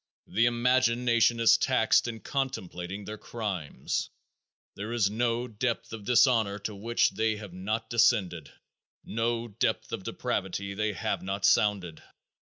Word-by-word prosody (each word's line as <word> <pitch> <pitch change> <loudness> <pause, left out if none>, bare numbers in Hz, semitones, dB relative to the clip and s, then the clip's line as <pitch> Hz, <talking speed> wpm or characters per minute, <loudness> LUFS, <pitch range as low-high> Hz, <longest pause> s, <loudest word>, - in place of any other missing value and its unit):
The 115 +2 +2
imagination 120 -1 +2
is 115 - +5
taxed - - +3
in 115 -1 -6
contemplating 100 -8 -4
their 105 0 -7
crimes. 100 -10 -4 0.7
There 105 +3 -5
is 105 -4 +2
no 120 +2 0
depth 115 +1 -3
of 110 -3 -8
dishonor 115 -4 +3
to 105 +1 -5
which 115 +4 +1
they 110 +2 0
have 105 -4 -9
not 105 +5 -3
descended 95 - +2 0.5
no 115 +1 -1
depth 105 +2 -1
of - - -3
depravity 100 0 -3
they 105 +1 -1
have 90 - -2
not 95 +1 -2
sounded. 100 -7 +2
110 Hz, 135 wpm, -28 LUFS, 100-120 Hz, 0.7 s, is